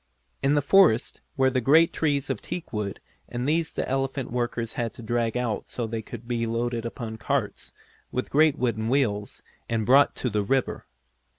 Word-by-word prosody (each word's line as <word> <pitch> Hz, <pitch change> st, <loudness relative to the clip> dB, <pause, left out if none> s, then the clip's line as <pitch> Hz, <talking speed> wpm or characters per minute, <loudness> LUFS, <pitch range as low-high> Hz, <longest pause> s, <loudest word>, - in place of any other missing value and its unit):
In 140 Hz, +2 st, +3 dB
the 145 Hz, -, +2 dB
forest 155 Hz, -, +4 dB, 0.2 s
were 130 Hz, -1 st, +4 dB
great 140 Hz, +6 st, +4 dB
trees 140 Hz, -3 st, 0 dB
of 125 Hz, -, -4 dB
teakwood 105 Hz, -, -4 dB, 0.3 s
and 125 Hz, +2 st, -3 dB
these 160 Hz, +1 st, +1 dB
the -, -, -3 dB
elephant 135 Hz, -1 st, -2 dB
workers 120 Hz, -1 st, -2 dB
had 115 Hz, -2 st, -2 dB
to 120 Hz, -, -10 dB
drag 115 Hz, +1 st, 0 dB
out 120 Hz, -4 st, -2 dB
so 120 Hz, -, -3 dB
they 110 Hz, 0 st, -3 dB
could 115 Hz, +1 st, -10 dB
be 115 Hz, -1 st, -1 dB
loaded 115 Hz, 0 st, -1 dB
upon 115 Hz, -2 st, -6 dB
carts, -, -, -2 dB, 0.4 s
with 125 Hz, -, -3 dB
great 155 Hz, 0 st, +4 dB
wooden 115 Hz, -3 st, -1 dB
wheels, 105 Hz, -7 st, 0 dB, 0.3 s
and 115 Hz, -2 st, 0 dB
brought 140 Hz, +4 st, +5 dB
to 125 Hz, -, -2 dB
the 105 Hz, 0 st, +1 dB
river. 130 Hz, +6 st, -1 dB
120 Hz, 175 wpm, -26 LUFS, 115-135 Hz, 0.4 s, brought